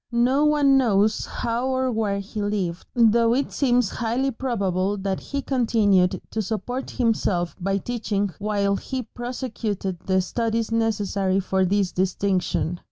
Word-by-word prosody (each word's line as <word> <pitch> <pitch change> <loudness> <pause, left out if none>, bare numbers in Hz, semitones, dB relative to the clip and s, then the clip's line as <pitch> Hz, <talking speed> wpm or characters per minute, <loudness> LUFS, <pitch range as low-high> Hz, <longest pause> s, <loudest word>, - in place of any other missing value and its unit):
No 250 +5 +3
one 285 -3 +4
knows 215 -3 +2
how 235 +2 -2
or 260 -1 0
where 215 -3 0
he 200 +2 -5
lived, 195 -4 -2
though 230 0 +4
it 275 +1 -1
seems 245 -6 +2
highly 245 +4 -1
probable 200 -6 -1
that 195 -1 -2
he 280 -1 -4
continued 215 -8 +2
to 220 - -1
support 235 +5 -4
himself 205 -8 0
by 195 +2 0
teaching 205 -3 -2
while 200 -1 0
he 260 +3 -4
prosecuted 220 -6 -4
the 190 +1 +1
studies 225 +4 -1
necessary 200 -4 0
for 190 0 +1
this 195 0 +1
distinction. 185 -2 0
215 Hz, 140 wpm, -24 LUFS, 195-245 Hz, -, one